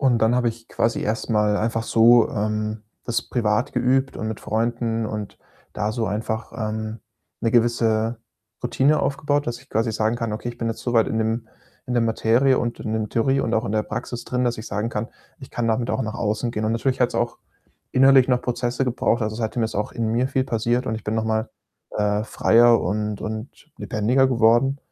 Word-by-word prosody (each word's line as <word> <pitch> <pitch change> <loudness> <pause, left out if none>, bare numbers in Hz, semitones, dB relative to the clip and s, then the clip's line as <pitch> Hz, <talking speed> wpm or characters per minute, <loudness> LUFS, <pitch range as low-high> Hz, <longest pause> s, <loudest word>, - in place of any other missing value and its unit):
Und 130 -4 +3
dann 115 +2 +3
habe 125 -1 +2
ich 115 0 -8
quasi 115 +1 0
erst 115 +2 -2
mal 105 -1 +2
einfach 115 +1 -1
so, 115 +1 +5
ähm, 105 0 -2 0.2
das 120 -1 -1
privat 110 0 0
geübt 130 +2 +1
und 110 - -3
mit 110 - -5
Freunden 115 0 -1
und 105 -2 -6 0.3
da 105 0 -2
so 115 -2 -1
einfach, 110 +2 -3
ähm, 110 0 -4 0.4
'ne 115 - +1
gewisse 115 -1 +2 0.4
Routine 130 +5 +2
aufgebaut, 145 +1 0
dass 120 0 -3
ich 135 - -21
quasi 115 +1 0
sagen 110 +2 0
kann: 115 -2 -3
„Okay, 115 +3 -4
bin 120 -1 -4
jetzt 115 - -4
so 120 - -2
weit 115 -2 +4
in 110 - -1
dem 115 +1 -1 0.4
in 125 - -2
der 120 - +3
Materie 115 +4 +3
und 120 0 -3
in 110 - -4
dem 110 -1 -1
Theorie 135 +4 +1
und 115 - -2
auch 110 - +1
in 100 - -3
der 110 0 +1
Praxis 120 +2 -5
drin, 125 0 -1
dass 120 -1 0
ich 110 - -8
sagen 105 +3 -2
kann, 115 0 -3 0.3
'ich 130 - -11
kann 120 -1 -2
damit 115 +1 0
auch - - -1
nach 110 0 -4
außen 110 +2 -1
gehen'.“ 105 - -2
Und 110 - +1
natürlich 130 +3 -1
hat's 125 - +2
auch 120 0 -1 0.5
innerlich 135 0 +6
noch 125 -1 +2
Prozesse 125 +1 -1
gebraucht. 120 -1 0
Also, 110 0 -2
seitdem 115 0 -1
ist 110 - -4
auch 105 +1 -1
in 115 -1 -2
mir 120 +4 +1
viel 130 -1 0
passiert 120 +1 0
und 110 - -1
ich 110 - -6
bin 105 - -1
noch 110 - 0
mal, 110 +1 -1 0.5
äh, 105 0 +1
freier 120 +1 +4
und 105 +2 -2
und 110 +4 -5 0.3
lebendiger 125 +5 +2
geworden 120 +3 +3
115 Hz, 210 wpm, -23 LUFS, 110-120 Hz, 0.5 s, innerlich